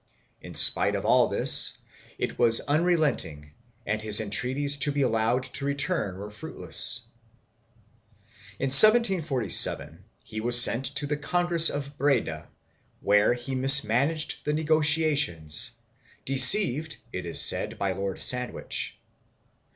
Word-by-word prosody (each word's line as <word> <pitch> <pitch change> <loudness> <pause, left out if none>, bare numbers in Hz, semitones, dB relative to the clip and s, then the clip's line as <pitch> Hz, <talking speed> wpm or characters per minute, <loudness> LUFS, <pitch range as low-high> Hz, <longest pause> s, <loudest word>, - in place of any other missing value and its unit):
2 - - -14
In - - -14
spite - - +3
of - - -7
all - - 0
this - - +4 0.4
it - - -8
was 115 -1 +4
unrelenting 145 - -4 0.3
and 110 +1 -5
his 110 -1 +1
entreaties 130 +7 -3
to 145 +1 +1
be 140 -1 -4
allowed 115 +1 -3
to 140 - -6
return 140 - -5
were 105 +2 -12
fruitless. 110 +3 -2 1.6
In 135 - -5
1747 170 - +3 0.2
he 110 - -10
was 120 +1 +4
sent 120 +2 +2
to 140 +3 -4
the 150 +1 -6
Congress 170 +2 +1
of 145 0 -9
Breda 120 - -4 0.5
where 105 +4 -1
he 125 +2 -10
mis 135 +2 +4
managed 140 +9 -3
the 150 - -5
negotiations, 150 - 0 0.5
deceived, 155 - +4
it 90 - -9
is 85 -1 -2
said, - - 0
by 100 -1 -5
Lord 95 0 -8
Sand 125 -1 -3
wich. - - -7
135 Hz, 130 wpm, -22 LUFS, 110-150 Hz, 1.6 s, this